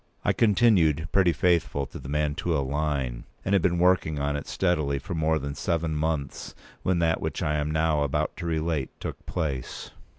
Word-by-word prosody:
I - - +3
continued 95 -8 +3
pretty 95 -3 +4
faithful 85 -3 +1
to 70 - -9
the 65 - -9
Mantua 75 +2 0
line, 70 -3 -2 0.2
and 95 - +1
had 100 - +4
been 85 0 +2
working 90 -4 +3
on 70 0 -1
it 70 - -5
steadily 75 -7 0
for 70 +5 -6
more 80 -1 +1
than 70 -1 -4
seven 80 +1 -1
months 75 -2 -2 0.3
when 90 -1 +1
that 80 -1 +1
which - - -2
I 75 0 +1
am 75 0 -1
now 80 -1 +1
about 70 -2 0
to 85 - -4
relate 80 -3 -1
took - - -6
place. 75 -7 -3
80 Hz, 185 wpm, -26 LUFS, 70-85 Hz, 0.3 s, pretty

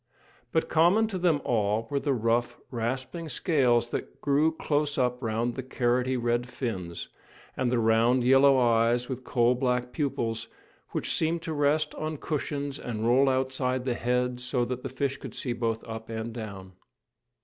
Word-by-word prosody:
But 160 - +1
common 175 +8 +4
to 190 -4 -3
them 165 -5 +2
all 110 -1 +1
were 140 - +1
the 145 - -1
rough, 115 +1 0
rasping 130 +7 -3
scales 125 -5 +2
that - - -5
grew 145 +3 +2
close 150 -2 -1
up 125 -1 0
round 115 +1 -1
the 130 - -4
carroty 125 0 0
red 120 0 0
fins, 95 -10 -4 0.5
and 125 -2 0
the 125 - +2
round 115 +2 +3
yellow 135 +2 +6
eyes 120 0 +3
with 130 -1 -5
coal 120 -1 +3
black 125 -1 -1
pupils, 115 -6 -2 0.4
which - - -2
seemed 165 +1 0
to 160 - -3
rest 150 +1 +1
on 155 0 -4
cushions 145 -1 -3
and 115 -2 -4
roll 135 +3 +5
outside 130 -1 0
the 125 - +1
head 125 +1 0
so 125 0 0
that 125 0 -4
the - - -5
fish 135 +1 -2
could - - -9
see 125 - -2
both 115 -1 -2
up 110 0 -7
and 115 0 -4
down. 100 -5 -7
125 Hz, 170 wpm, -28 LUFS, 120-140 Hz, 0.5 s, yellow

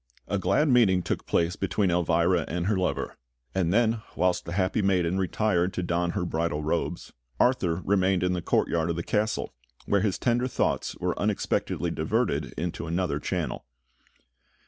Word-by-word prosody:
A 100 - -1
glad 150 +10 +2
meeting 110 -9 +4
took - - -3
place 85 +1 +1
between 100 -1 0
Elvira 85 0 +2
and 85 +1 -2
her 105 +2 +2
lover; 95 -1 -2 0.4
and 90 -3 +1
then, 115 +1 +2
whilst 90 -1 +1
the 85 - -5
happy 95 +3 +1
maiden 95 -2 +1
retired 95 -1 +1
to 90 - -1
don 85 0 0
her 90 - 0
bridal 80 -2 -1
robes, 75 - -2 0.3
Arthur 95 -9 +2
remained 95 -2 +2
in 90 0 +1
the 90 - -2
courtyard 85 0 +1
of 85 - 0
the 85 - -3
castle, 105 +3 -1 0.3
where 100 -1 +2
his 100 -2 0
tender 120 +1 +1
thoughts 125 - -1
were - - -2
unexpectedly - - -1
diverted - - 0
into 85 0 -3
another 85 -3 -1
channel. - - -3
90 Hz, 165 wpm, -27 LUFS, 85-100 Hz, 0.4 s, meeting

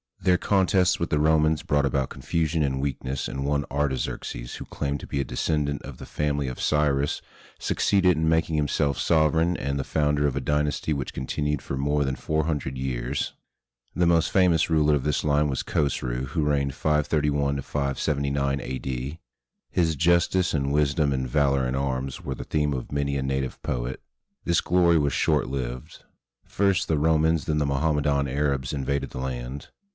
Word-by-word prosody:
Their 90 -1 +3
contests 95 -1 +2
with 85 - -1
the 75 - +1
Romans 80 0 +3
brought 70 -1 +2
about 70 0 0
confusion 80 -1 -1
and 65 -2 0
weakness, 70 -1 -3
and 70 - -4
one 70 0 0
Artaxerxes, 65 -3 -2
who - - -7
claimed 70 0 -3
to - - -9
be 70 - -2
a - - +1
descendant 70 +3 -1
of - - -9
the - - -9
family 75 -2 -1
of 65 - -5
Cyrus, 75 -2 +1 0.4
succeeded 95 -4 +2
in 80 0 +1
making 80 0 +1
himself 75 -1 +1
sovereign 80 +2 +3
and 70 0 -2
the - - -1
founder 75 0 +1
of 70 - -2
a - - 0
dynasty 75 +1 0
which 70 -3 -4
continued 75 +3 -2
for - - -4
more 70 +2 +1
than 65 -1 -1
four 80 +2 -1
hundred 70 -5 -2
years. 65 +1 -2 0.6
The 90 - +2
most 85 -1 +3
famous 90 -4 +3
ruler 75 -2 +3
of 70 - -2
this 75 -2 0
line 75 0 +2
was 65 - -2
Khosru, 65 -3 -1
who 75 +4 -1
reigned 70 -2 0
531 75 -2 +1 0.3
79 70 -1 0
A.D. 65 +3 -4 0.5
His 80 -3 +1
justice 85 +3 +2
and 70 -2 0
wisdom 75 0 +2
and 65 -1 -2
valor 70 -1 +2
in 65 - -2
arms 65 -1 -2
were 65 - -3
the - - -6
themes 75 -2 0
of 65 - -6
many 70 -1 -1
a 65 - -1
native 65 0 -2
poet. 60 0 -3 0.4
This 85 -1 +2
glory 85 -1 +3
was 70 -1 +1
short - - +2
lived. 65 +3 -5 0.4
First, 100 -2 +1
the 80 -2 +1
Romans, 80 +1 +2
then 75 - 0
the 75 - +1
Mohammedan 70 0 +1
Arabs 70 -1 -1
invaded 70 0 -2
the - - -6
land. 65 +1 -5
70 Hz, 175 wpm, -25 LUFS, 70-80 Hz, 0.6 s, Their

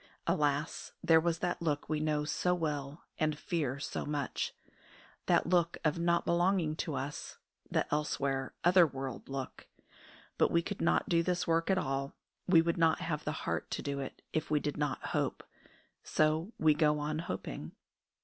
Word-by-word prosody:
Alas, 150 -3 0
there 165 -2 +6
was 170 0 0
that 175 - -2
look 150 -3 -1
we 155 0 0
know 150 -1 0
so 180 +4 +1
well 150 -3 -3 0.2
and 155 -2 +1
fear 145 -5 -2
so - - -3
much 145 -2 -2 0.8
that - - +4
look 170 -1 +2
of 155 +2 +2
not 170 0 +2
belonging 175 -2 +2
to 155 -2 -3
us, 135 +3 -5 0.3
the - - +1
elsewhere, 140 -3 -1
other 175 -1 +6
world 135 -2 -6
look. 135 -1 -5 0.7
But - - +5
we 170 0 +2
could 205 +2 -5
not 170 - +2
do 170 -1 +3
this 180 +1 0
work 165 +1 +1
at 190 - +4
all, 135 -3 -2 0.3
we 170 -3 +6
would 170 0 0
not 165 -1 +4
have 150 -3 -3
the 150 - 0
heart 85 -1 -2
to - - -3
do 140 -1 -2
it, 135 - -7
if 160 0 -1
we 150 -1 +3
did 145 0 -2
not 145 -2 -2
hope. - - -1 0.6
So 155 +6 +1
we 155 -1 +5
go 150 0 +3
on 150 +1 -2
hoping. 165 - -5
155 Hz, 175 wpm, -32 LUFS, 145-170 Hz, 0.8 s, there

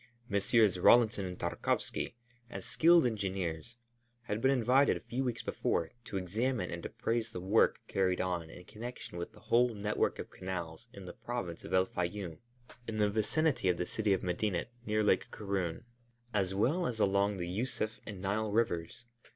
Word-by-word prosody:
Messrs. 100 -1 +3
Rawlinson 110 -1 +5
and 90 -1 -5
Tarkowski, 85 +6 -1 0.3
as - - -6
skilled 170 -1 +5
engineers, 95 -3 -2 0.5
had 110 -2 -3
been 130 - +4
invited 130 +1 +4
a - - -11
few 130 +3 -3
weeks 120 -3 -2
before, 80 -1 -1
to 100 - -4
examine 110 +3 -1
and 85 0 -5
appraise 115 0 -2
the 100 - -6
work 95 +5 +3
carried 95 -2 +1
on 90 -3 -1
in 90 - -12
connection 110 -4 -7
with 85 - -5
the - - -15
whole 120 -1 +3
net 105 +1 -2
work - - +2
of - - -7
canals 85 -4 -5
in 100 -2 -10
the 90 - -7
Province 120 -9 -5
of - - -8
El 95 0 +5
Fayûm, 90 -1 -4 0.5
in 110 -1 -3
the 105 -1 +3
vicinity 110 - +1
of 90 - +2
the 90 - -1
city 110 +1 0
of 95 - +2
Medinet 90 +3 -1 0.2
near 110 0 +2
Lake 100 -2 +2
Karûn, 100 -2 -3 0.5
as 95 -2 0
well 155 - +2
as 115 -3 -3
along 100 0 +2
the 90 - -3
Yûsuf 110 +2 -2
and 105 -4 -7
Nile 105 +2 -1
rivers. 105 -1 -1
100 Hz, 175 wpm, -32 LUFS, 90-115 Hz, 0.5 s, Rawlinson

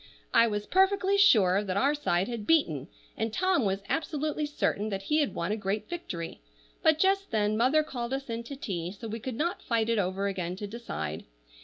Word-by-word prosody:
I 230 0 +6
was 210 -1 -2
perfectly 385 - +3
sure 210 - +5
that 190 -1 -2
our 275 +6 +3
side 195 -11 0
had 235 -4 -5
beaten, 160 - +2 0.3
and 225 0 -2
Tom 365 - +2
was 195 0 -1
absolutely 305 0 -1
certain 220 -7 -1
that 195 -1 -3
he 300 +9 +1
had 290 - 0
won 170 +4 -2
a - - +1
great 205 0 -2
victory; 175 - -6 0.4
but 315 -1 +4
just 390 +3 +2
then 215 -1 +1
mother 260 +7 +3
called 245 -5 -5
us 270 +1 -3
in 230 -1 -3
to 280 - -7
tea, 180 -10 -4
so 210 +4 -8
we 225 +1 -4
could 255 +1 -5
not 335 +8 -1
fight 230 -1 0
it 230 -2 +2
over 190 +1 -1
again 180 -2 -3
to 205 - -6
decide. 85 - -5
225 Hz, 205 wpm, -29 LUFS, 195-300 Hz, 0.4 s, I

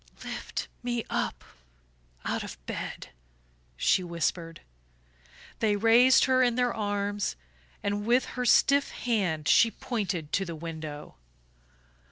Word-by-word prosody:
"Lift - - -5
me 240 -2 -2
up - - -2 0.8
out - - -1
of - - -8
bed," - - -6 0.7
she 185 - +3
whispered. 170 -1 -3 1.0
They 215 -2 +2
raised 230 +5 +6
her 260 -1 +3
in 245 -2 +3
their 245 -1 +1
arms, 205 -1 -2 0.5
and 205 0 -1
with 245 +2 +3
her 250 - -2
stiff 280 +3 +4
hand 185 -10 -1
she 230 - +6
pointed 200 - -4
to 195 - +2
the 170 -3 -6
window. 155 -2 -7
205 Hz, 120 wpm, -28 LUFS, 170-240 Hz, 1.0 s, raised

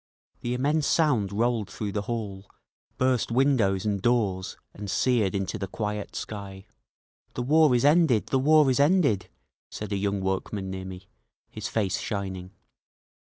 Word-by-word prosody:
The 120 +1 -2
immense 145 +4 +1
sound 125 - +2
rolled 115 0 0
through 105 -2 -4
the 105 - -2
hall, 105 -3 -5 0.5
burst 130 -3 +1
windows 115 -7 +2
and 100 -2 -1
doors 100 -6 0 0.2
and 100 0 -7
seared 110 -1 +1
into 100 +2 -2
the 95 - -3
quiet 105 +1 -4
sky. 100 -2 -7 0.7
"The 125 - -2
war 150 0 +4
is 120 - +2
ended! 145 -7 +4
The 135 - +2
war 155 +2 +5
is 130 - 0
ended!" 145 - +3 0.4
said 105 0 -7
a 100 - 0
young 100 0 -1
workman 95 0 -3
near 95 0 -5
me, 95 0 -9 0.4
his 110 +1 -5
face 100 -5 -1
shining. 95 -3 -4
105 Hz, 155 wpm, -26 LUFS, 95-125 Hz, 0.7 s, war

